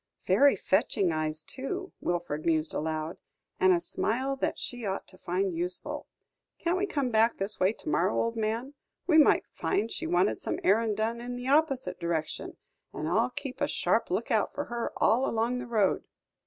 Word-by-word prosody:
"Very 285 -3 +5
fetching 190 -1 +1
eyes, 155 0 -2
too," 365 - -5
Wilfred 175 -4 -2
mused 160 -1 +1
aloud, 155 +1 -3 0.4
"and 185 0 +5
a 175 - +4
smile 255 +9 -1
that - - -1
she 245 -1 -5
ought 195 -2 -2
to - - -14
find 185 +1 -1
useful. 175 +2 -2 0.5
Can't 340 +1 0
we 400 - 0
come 275 -8 -1
back 225 +1 +3
this 195 +2 -2
way 185 +3 +3
to - - -15
morrow, 170 +6 +2
old 230 0 0
man? 225 +5 -2 0.3
We 320 -3 +5
might 300 - +5
find 225 +2 -1
she - - -4
wanted 180 +3 +2
some - - -2
errand 215 +1 +3
done 230 +2 -1
in 245 +1 -5
the 245 +1 -4
opposite 270 -10 +2
direction, 165 -2 -3 0.3
and - - -4
I'll - - +2
keep 275 0 -6
a - - +3
sharp - - +1
look - - -1
out - - +1
for 290 - -1
her 235 -1 -2
all 240 +5 +3
along 230 +2 0
the 250 - -6
road!" 215 -5 +2
220 Hz, 185 wpm, -29 LUFS, 175-250 Hz, 0.5 s, Very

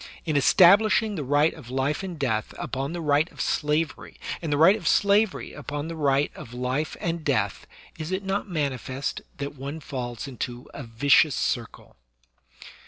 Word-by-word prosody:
In 155 -3 -1
establishing 205 +8 +5
the 160 -7 -3
right 145 +4 +3
of 135 -7 -12
life 135 +5 -1
and 185 -3 -6
death 115 -6 -1
upon 135 +3 -3
the 175 0 -4
right 150 +1 +2
of - - -18
slavery, 150 0 -1 0.2
and 165 -3 -3
the 145 - +2
right 170 +7 +7
of 220 - -5
slavery 205 0 +2
upon 145 +1 -5
the 165 - -5
right 145 -2 +1
of 120 - -10
life 130 +5 -2
and 170 -1 -2
death, 110 -10 -1 0.3
is 155 +2 -5
it 190 +1 -2
not 195 +1 -2
manifest 140 -4 -3 0.2
that 140 0 -4
one 140 +3 -6
falls 125 -3 -5
into 125 -1 -6
a - - -7
vicious 135 +5 +3
circle - - -3
145 Hz, 170 wpm, -25 LUFS, 135-165 Hz, 0.3 s, right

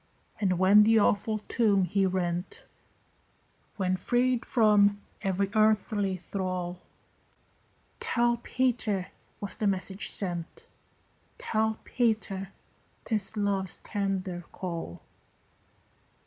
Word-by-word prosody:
And 185 -4 +1
when 190 +3 +7
the 225 +1 +5
awful 215 +1 +3
tomb 210 -2 +2
he 190 +2 +1
rent, 180 -1 -3 1.1
When 185 -2 0
freed 245 +4 +1
from 205 -3 +4 0.2
every 195 0 0
earthly 215 -3 +2
thrall, 180 -1 -4 1.2
"Tell 240 0 +1
Peter" 235 -6 -1 0.3
was 200 - -3
the 215 - 0
message 190 0 -1
sent; 175 -4 -3 0.7
"Tell 220 0 0
Peter" 215 -5 -1 0.6
'tis 215 -1 -2
love's 195 -2 -1
tender 190 -3 -2
call. 170 - -6
200 Hz, 90 wpm, -28 LUFS, 185-220 Hz, 1.2 s, when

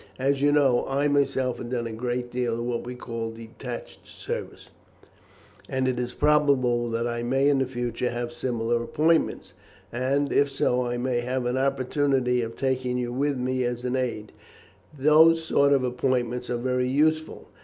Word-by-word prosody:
As 135 +1 0
you 145 0 +4
know, 135 -4 +3
I 140 +2 +1
myself 135 -3 +1
have 120 - -6
done 120 -2 -2
a 115 - -4
great 120 +2 -3
deal 120 -2 -1
of 120 - -3
what 120 -1 -2
we 125 - -5
call 115 -2 -5
detached 115 +2 -9
service, - - -7 1.0
and 130 -1 0
it 125 -1 0
is 125 0 -2
probable 135 -6 +2
that 115 +1 -1
I 120 0 -2
may 135 +4 +1
in 140 -2 +3
the 130 - 0
future 120 -1 -2
have 120 0 -4
similar 120 -1 -1
appointments, 160 +7 0 0.4
and, 135 +4 0
if 140 0 +3
so, 125 -2 0
I 120 0 -2
may 125 0 0
have 125 +1 -2
an 125 +1 0
opportunity 130 -1 +1
of 115 0 -5
taking 130 -1 -1
you 120 -1 -2
with 140 +2 0
me 130 0 -1
as 120 0 -3
an 125 +1 -1
aide. 120 -5 -3 0.7
Those 160 +4 +5
sort 140 -3 +3
of 135 -2 +3
appointments 125 -1 -1
are 120 - -1
very 125 +1 0
useful. 155 +4 0
125 Hz, 175 wpm, -25 LUFS, 120-135 Hz, 1.0 s, Those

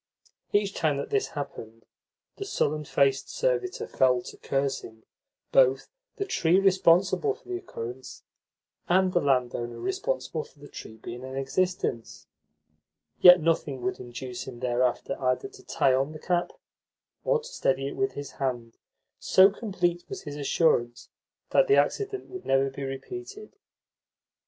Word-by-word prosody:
Each 205 -1 +1
time 150 -3 0
that - - -5
this 415 -1 +1
happened, 115 -5 -7 0.5
the 400 - -4
sullen 150 - -1
faced 135 -1 +1
servitor 455 -7 -1
fell 125 -2 +2
to - - -10
cursing 135 -5 -3 0.5
both 135 0 +4 0.3
the 400 - -2
tree 180 - +3
responsible 190 - +3
for - - -23
the 365 -1 -3
occurrence 130 - -8 0.7
and 185 +1 +3
the 175 - +3
landowner 125 -3 0
responsible 385 - -2
for - - -21
the 145 0 -13
tree 110 - -10
being 120 +2 -8
in 130 0 -7
existence; 135 -3 -2 0.9
yet 180 0 +9
nothing 155 -5 0
would 190 -1 -2
induce 120 0 -7
him 125 -2 -8
thereafter 125 +2 0
either 130 - 0
to 395 -1 -16
tie 135 - +2
on 135 +4 0
the 155 - -9
cap 175 +1 0 0.7
or - - +3
to 460 - -11
steady 135 - 0
it - - -5
with 200 0 0
his 140 -1 -7
hand, 120 -4 -4 0.4
so 190 +1 +6
complete 180 -5 -1
was - - -6
his 145 -1 -7
assurance 135 -4 +1 0.4
that - - +4
the 420 - +5
accident 405 -1 0
would 375 0 -8
never 135 0 +2
be 135 - -8
repeated. 370 - -7
150 Hz, 145 wpm, -27 LUFS, 130-200 Hz, 0.9 s, yet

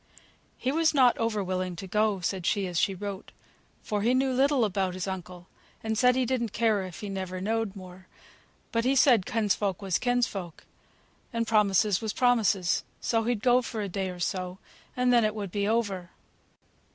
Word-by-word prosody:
"He 260 - -1
was 320 +1 +2
not 255 -3 +5
over 225 -3 0
willing 185 -1 -2
to 190 +3 -7
go," 210 0 0
said 180 0 -2
she, 200 -2 +1
as 175 -2 -1
she 195 - +1
wrote, 200 0 -6 0.5
"for 210 -1 -2
he 240 +4 +2
knew 265 0 +2
little 270 -1 +3
about 190 -2 -1
his 185 0 -4
uncle, 180 -2 -6 0.4
and 220 0 -1
said 250 +3 +4
he 260 -1 +1
didn't 235 -3 -1
care 220 -3 +2
if 185 -2 -8
he 210 - -5
never 185 -2 -4
knowed 220 +1 -1
more. 185 -1 -12 0.6
But 230 0 0
he 260 +3 +2
said 245 -7 +4
kinsfolk 205 -4 0
was 195 -4 -1
kinsfolk, 230 -9 -2 0.7
and 230 -2 -1
promises 210 -2 +3
was 220 -2 -3
promises, 220 -8 +2 0.2
so 225 -1 0
he'd 235 -3 -1
go 250 0 +5
for 230 -2 -5
a 200 - -3
day 190 +1 -2
or 180 -1 -8
so, 185 0 -3 0.4
and 250 0 +3
then 240 -1 +5
it 215 0 0
would 200 -4 -5
be 200 +1 -1
over." 200 -6 -1
210 Hz, 190 wpm, -28 LUFS, 185-235 Hz, 0.7 s, not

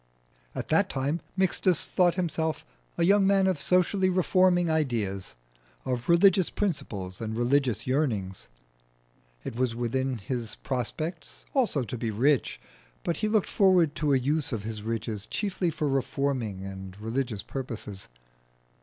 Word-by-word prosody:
At - - -4
that - - +3
time 140 +5 -1 0.2
Mixtus 185 -1 +2
thought 175 -2 +3
himself 160 -3 -1 0.3
a - - +2
young 195 +2 +5
man 195 -1 +4
of 185 -6 +1
socially 185 +2 +3
reforming 185 -1 +3
ideas, 115 - -1 0.5
of 125 +1 -3
religious 180 +1 +5
principles 105 - -3
and 110 0 -3
religious 120 -2 +1
yearnings. 115 -9 -1 1.0
It - - -6
was 125 -1 0
within 125 +2 -1
his 115 +1 -4
prospects 145 - -4
also 230 - +2
to 120 +2 -5
be 115 - -1
rich, 130 +6 +1 0.4
but 170 - -1
he 215 - 0
looked 215 -2 +1
forward 180 -6 +4
to 150 -2 +1
a - - +5
use 145 +4 0
of 110 -4 -3
his 110 -1 -5
riches 110 -1 -3
chiefly 195 -4 -1
for 155 -1 -2
reforming 130 -7 -1
and 95 0 -8
religious 115 -1 -2
purposes. 115 -7 -6
135 Hz, 140 wpm, -27 LUFS, 115-175 Hz, 1.0 s, young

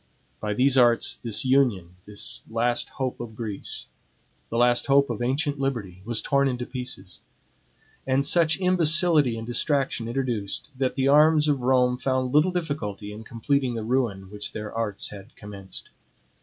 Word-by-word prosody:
By 105 +6 -3
these 130 +3 +4
arts 120 -1 +3
this 115 0 -1
union, 120 -10 +2
the 105 0 -10 0.3
last 120 +1 0
hope 130 -2 -4
of 115 -2 -7
Greece, 110 -3 -3 0.6
the 115 - -3
last 120 0 +3
hope 140 -1 +4
of 120 - -5
ancient 140 +3 -1
liberty, 110 -10 -3
was 115 -1 -1
torn 140 -1 +2
into 125 -2 -3
pieces; 125 -8 -6 0.9
and 135 +1 +2
such 165 0 +3
imbecility 165 -7 +3
and 115 - -6
distraction 130 -1 0
introduced, 120 0 -2
that 130 0 -1
the 135 -1 +1
arms 150 +2 +5
of 145 -2 +1
Rome 125 0 +2
found 130 0 -1
little 150 +5 +4
difficulty 115 - -4
in 110 +2 -9
completing 125 +2 -1
the 115 - -4
ruin 110 -6 -1
which 105 0 -5
their 105 -1 -6
arts 110 -3 -2
had 100 -1 -12
commenced. 100 -3 -7
125 Hz, 155 wpm, -25 LUFS, 110-140 Hz, 0.9 s, arms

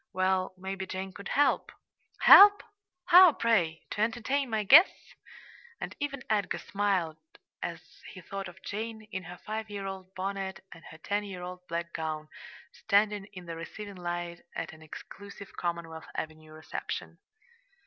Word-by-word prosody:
"Well, 185 0 +1
maybe 190 0 -5
Jane 190 0 -5
could 200 - -9
help." 290 +1 +2 0.5
"Help! 405 +1 +10 0.4
How, 360 -2 +9
pray? 175 -11 +1
to 210 - -2
entertain 240 +5 0
my 220 -1 0
guests?" 305 - +6 0.7
And - - -6
even 275 -3 -3
Edgar 210 -3 0
smiled 190 -6 -1 0.4
as - - -7
he - - -10
thought 195 -1 -6
of 175 +1 -14
Jane, 220 +1 -5
in 190 -2 -5
her 175 +1 -9
five 220 +2 -5
year 200 -1 -5
old 190 -1 -7
bonnet 195 0 -4
and 165 - -13
her 160 - -11
ten 205 +6 -2
year 190 -3 -7
old 180 0 -8
black 170 0 -4
gown, 155 -1 -4 0.4
standing 205 -1 +1
in 180 -2 -9
the 165 -1 -6
receiving 200 +5 -8
line 175 -1 -4
at 165 -1 -4
an 160 - -15
exclusive 200 +5 -11
Commonwealth 170 -2 -4
Avenue 155 0 -6
reception. 155 0 -6
190 Hz, 150 wpm, -29 LUFS, 170-210 Hz, 0.7 s, Help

